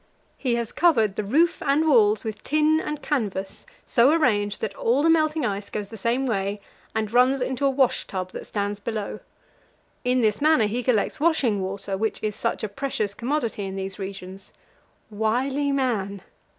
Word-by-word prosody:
He 250 Hz, -4 st, -1 dB
has 235 Hz, -2 st, -3 dB
covered 225 Hz, -, +3 dB
the 215 Hz, -, -2 dB
roof 310 Hz, +12 st, +2 dB
and 295 Hz, +3 st, +2 dB
walls 215 Hz, -7 st, +4 dB
with 220 Hz, -2 st, -6 dB
tin 305 Hz, +2 st, +2 dB
and 300 Hz, -1 st, -5 dB
canvas, 200 Hz, -9 st, -3 dB, 0.2 s
so 245 Hz, -1 st, +4 dB
arranged 215 Hz, -10 st, +2 dB
that 215 Hz, -3 st, -2 dB
all 245 Hz, +8 st, +1 dB
the 325 Hz, -, +5 dB
melting 310 Hz, -3 st, +2 dB
ice 200 Hz, -2 st, -3 dB
goes 210 Hz, -1 st, -5 dB
the -, -, -7 dB
same 235 Hz, +5 st, 0 dB
way, 200 Hz, -3 st, -1 dB, 0.4 s
and 220 Hz, 0 st, -2 dB
runs 255 Hz, +2 st, +4 dB
into 260 Hz, +2 st, 0 dB
a -, -, +4 dB
wash 265 Hz, -2 st, +1 dB
tub 185 Hz, -1 st, -4 dB
that -, -, -8 dB
stands 205 Hz, 0 st, -2 dB
below. 215 Hz, 0 st, -4 dB, 0.8 s
In 250 Hz, 0 st, +2 dB
this 215 Hz, 0 st, +1 dB
manner 305 Hz, -7 st, +4 dB
he 225 Hz, +4 st, -1 dB
collects 245 Hz, +3 st, 0 dB
washing 275 Hz, -, +2 dB
water, 195 Hz, +1 st, -3 dB
which 220 Hz, 0 st, -1 dB
is 210 Hz, -1 st, -1 dB
such -, -, -2 dB
a -, -, 0 dB
precious 215 Hz, -2 st, -3 dB
commodity 235 Hz, -2 st, -2 dB
in 190 Hz, 0 st, -5 dB
these 195 Hz, 0 st, -5 dB
regions 190 Hz, 0 st, -8 dB, 0.6 s
wily 260 Hz, +7 st, 0 dB
man! 210 Hz, -8 st, -1 dB
225 Hz, 175 wpm, -24 LUFS, 205-275 Hz, 0.8 s, the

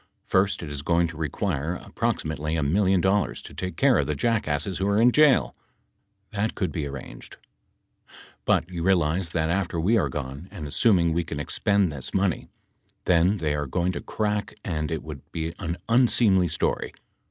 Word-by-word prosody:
First 95 Hz, -1 st, +1 dB
it 75 Hz, -, -6 dB
is 70 Hz, -1 st, -5 dB
going 85 Hz, +3 st, +2 dB
to 80 Hz, -, -9 dB
require 80 Hz, +1 st, -2 dB
ap -, -, -14 dB
proximately 80 Hz, 0 st, -1 dB
a 75 Hz, -, 0 dB
million 95 Hz, +4 st, +2 dB
dollars 95 Hz, +2 st, +1 dB
to -, -, -11 dB
take 90 Hz, 0 st, -5 dB
care 135 Hz, -3 st, +4 dB
of 70 Hz, -, 0 dB
the 75 Hz, -, -1 dB
jackasses 90 Hz, -2 st, -1 dB
who 95 Hz, -, 0 dB
are 100 Hz, +1 st, +2 dB
in 120 Hz, +2 st, +6 dB
jail. 150 Hz, -1 st, +4 dB, 0.8 s
That 105 Hz, +1 st, -1 dB
can 95 Hz, -5 st, -1 dB
be 75 Hz, 0 st, -3 dB
arranged. 70 Hz, -2 st, -9 dB
That -, -, -33 dB
could -, -, -47 dB
be -, -, -43 dB
arranged. -, -, -20 dB
But 85 Hz, -, +2 dB
you 85 Hz, -2 st, -4 dB
realize 85 Hz, -1 st, +2 dB
that 80 Hz, 0 st, 0 dB
after 90 Hz, -2 st, -1 dB
we 105 Hz, +8 st, +3 dB
are -, -, 0 dB
gone, 70 Hz, +2 st, -6 dB
and 90 Hz, -7 st, -7 dB
assuming 85 Hz, 0 st, +3 dB
we 85 Hz, +1 st, 0 dB
can 80 Hz, -3 st, -5 dB
expend 100 Hz, +5 st, +1 dB
this 70 Hz, -3 st, -5 dB
money, 95 Hz, -2 st, 0 dB, 0.6 s
then 90 Hz, +3 st, +3 dB
they 80 Hz, -5 st, -1 dB
are 75 Hz, -1 st, -2 dB
going 90 Hz, +6 st, 0 dB
to -, -, -5 dB
crack 105 Hz, -1 st, -2 dB
and 75 Hz, -4 st, -2 dB
it 80 Hz, -2 st, -3 dB
would 75 Hz, -3 st, -8 dB
be 80 Hz, 0 st, -3 dB
an 85 Hz, -2 st, -3 dB
unseemly 115 Hz, -6 st, +4 dB
story. 80 Hz, -, -1 dB
85 Hz, 200 wpm, -25 LUFS, 75-100 Hz, 0.8 s, in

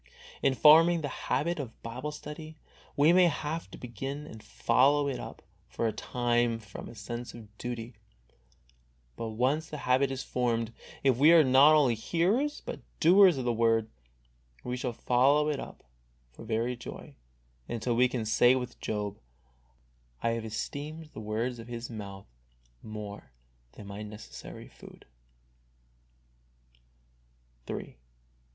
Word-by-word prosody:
In 135 Hz, -1 st, +2 dB
forming 165 Hz, +5 st, +7 dB
the 145 Hz, -3 st, -6 dB
habit 170 Hz, +2 st, 0 dB
of 120 Hz, -5 st, -7 dB
Bible 125 Hz, +6 st, -5 dB
study 155 Hz, +1 st, -9 dB, 0.4 s
we 150 Hz, +4 st, +6 dB
may 180 Hz, -1 st, +6 dB
have 160 Hz, +1 st, -3 dB
to -, -, -10 dB
begin 135 Hz, +5 st, -6 dB
and 110 Hz, -7 st, -11 dB
follow 135 Hz, +6 st, +2 dB
it 135 Hz, -, -2 dB
up -, -, -9 dB, 0.2 s
for -, -, -3 dB
a -, -, 0 dB
time 120 Hz, +1 st, 0 dB
from 105 Hz, -4 st, -10 dB
a 115 Hz, -, -11 dB
sense 120 Hz, +4 st, -6 dB
of 105 Hz, -3 st, -13 dB
duty, 120 Hz, -1 st, -5 dB, 1.2 s
but 115 Hz, -, -4 dB
once 130 Hz, +8 st, 0 dB
the 150 Hz, -, -5 dB
habit 130 Hz, +2 st, +3 dB
is 135 Hz, 0 st, -4 dB
formed, 115 Hz, -2 st, -1 dB, 0.3 s
if 135 Hz, -3 st, +3 dB
we 150 Hz, +5 st, +7 dB
are 165 Hz, -2 st, +8 dB
not 140 Hz, +3 st, +7 dB
only 140 Hz, -6 st, +4 dB
hearers 185 Hz, -, 0 dB
but -, -, -5 dB, 0.2 s
doers 180 Hz, -1 st, +7 dB
of 130 Hz, -, -3 dB
the 120 Hz, -, +1 dB
Word, 115 Hz, -1 st, +2 dB, 0.7 s
we 125 Hz, -, -3 dB
shall 125 Hz, 0 st, -2 dB
follow 135 Hz, +6 st, +3 dB
it 145 Hz, -2 st, -1 dB
up -, -, -9 dB, 0.5 s
for -, -, -12 dB
very 115 Hz, +3 st, -1 dB
joy, 120 Hz, -, -9 dB, 0.6 s
until 120 Hz, +1 st, -1 dB
we 125 Hz, +2 st, +5 dB
can 120 Hz, -3 st, -3 dB
say 120 Hz, +3 st, +5 dB
with 125 Hz, -2 st, -5 dB
Job, 105 Hz, -2 st, -3 dB, 0.5 s
" -, -, -32 dB
I 115 Hz, -, +2 dB
have 115 Hz, -1 st, -3 dB
esteemed 150 Hz, +8 st, -5 dB
the -, -, -7 dB
words 115 Hz, +3 st, -2 dB
of 115 Hz, -, -9 dB
His 120 Hz, 0 st, -6 dB
mouth 100 Hz, -3 st, -8 dB, 0.6 s
more 105 Hz, -, -8 dB, 0.4 s
than 105 Hz, -, -11 dB
my 100 Hz, +1 st, -7 dB
necessary 105 Hz, 0 st, -9 dB
food." -, -, -15 dB
125 Hz, 145 wpm, -29 LUFS, 110-145 Hz, 1.2 s, are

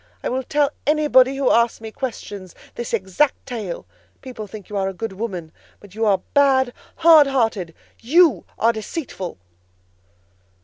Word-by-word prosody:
I -, -, -1 dB
will 260 Hz, +2 st, -1 dB
tell 290 Hz, +2 st, +1 dB, 0.2 s
anybody 280 Hz, -3 st, +4 dB
who 275 Hz, -2 st, +2 dB
asks 235 Hz, 0 st, +2 dB
me 220 Hz, -1 st, -8 dB
questions, 205 Hz, -7 st, -6 dB, 0.2 s
this 240 Hz, -, -6 dB
exact 225 Hz, +7 st, 0 dB
tale. 215 Hz, -8 st, -5 dB, 0.4 s
People 245 Hz, -5 st, -7 dB
think 205 Hz, 0 st, -10 dB
you 210 Hz, -, -8 dB
a 195 Hz, -1 st, -1 dB
good 220 Hz, +1 st, -5 dB
woman, 185 Hz, -6 st, -5 dB, 0.3 s
but 205 Hz, -2 st, -16 dB
you 220 Hz, +1 st, 0 dB
are 195 Hz, -3 st, +2 dB
bad, 265 Hz, -3 st, +3 dB, 0.2 s
hard 320 Hz, -3 st, +7 dB
hearted. 225 Hz, -10 st, -1 dB, 0.2 s
You 295 Hz, -, +4 dB
are 230 Hz, +1 st, +3 dB
deceitful!" 220 Hz, -, -6 dB
230 Hz, 145 wpm, -21 LUFS, 200-270 Hz, 0.4 s, hard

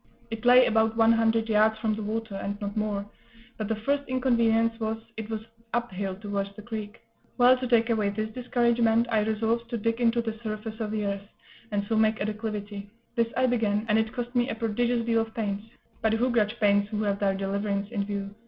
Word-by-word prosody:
It 225 Hz, +1 st, -5 dB
lay 250 Hz, +1 st, +8 dB
about 220 Hz, 0 st, +2 dB
one 225 Hz, 0 st, +6 dB
hundred 225 Hz, 0 st, +2 dB
yards 220 Hz, 0 st, +3 dB
from 220 Hz, 0 st, 0 dB
the 215 Hz, -, -4 dB
water, 220 Hz, 0 st, -3 dB
and 200 Hz, +1 st, -4 dB
not 205 Hz, -1 st, -4 dB
more; 210 Hz, -2 st, -1 dB, 0.5 s
but 215 Hz, -, -3 dB
the 225 Hz, -, 0 dB
first 275 Hz, +7 st, 0 dB
inconvenience 230 Hz, -3 st, +2 dB
was, 220 Hz, 0 st, -1 dB, 0.2 s
it 220 Hz, 0 st, -6 dB
was 220 Hz, -1 st, -3 dB, 0.3 s
up 240 Hz, -2 st, -1 dB
hill 190 Hz, 0 st, -3 dB
towards 200 Hz, -1 st, -4 dB
the 210 Hz, -, -10 dB
creek. 220 Hz, -1 st, -6 dB, 0.4 s
Well, 250 Hz, 0 st, +7 dB
to 255 Hz, -, -2 dB
take 235 Hz, -1 st, +3 dB
away 215 Hz, -3 st, +1 dB
this 215 Hz, +2 st, -3 dB
discouragement, 235 Hz, -1 st, +2 dB
I 220 Hz, -, +3 dB
resolved 225 Hz, +2 st, 0 dB
to 235 Hz, -, -2 dB
dig 230 Hz, +2 st, -1 dB
into 235 Hz, 0 st, +3 dB
the 225 Hz, -2 st, -3 dB
surface 215 Hz, 0 st, -5 dB
of 220 Hz, -2 st, -2 dB
the 210 Hz, -1 st, -2 dB
earth, 200 Hz, 0 st, -3 dB, 0.4 s
and 205 Hz, -1 st, -1 dB
so 225 Hz, -, 0 dB
make 220 Hz, 0 st, +3 dB
a 200 Hz, -, -1 dB
declivity: 210 Hz, -2 st, -5 dB, 0.3 s
this 230 Hz, -2 st, +2 dB
I 255 Hz, -, +4 dB
began, 220 Hz, -4 st, +1 dB
and 215 Hz, +1 st, +4 dB
it 220 Hz, 0 st, 0 dB
cost 245 Hz, 0 st, -5 dB
me 245 Hz, +1 st, +2 dB
a -, -, -2 dB
prodigious 230 Hz, +1 st, 0 dB
deal 230 Hz, -1 st, +2 dB
of 225 Hz, 0 st, -6 dB
pains 210 Hz, -1 st, -3 dB, 0.3 s
(but 220 Hz, 0 st, +2 dB
who 245 Hz, +3 st, +2 dB
grudge 230 Hz, 0 st, +1 dB
pains 205 Hz, -1 st, +3 dB
who 215 Hz, -1 st, -2 dB
have 200 Hz, -1 st, 0 dB
their 195 Hz, -1 st, +1 dB
deliverance 200 Hz, +1 st, -2 dB
in 205 Hz, -4 st, -1 dB
view?) 200 Hz, -1 st, -4 dB
220 Hz, 220 wpm, -27 LUFS, 210-230 Hz, 0.5 s, lay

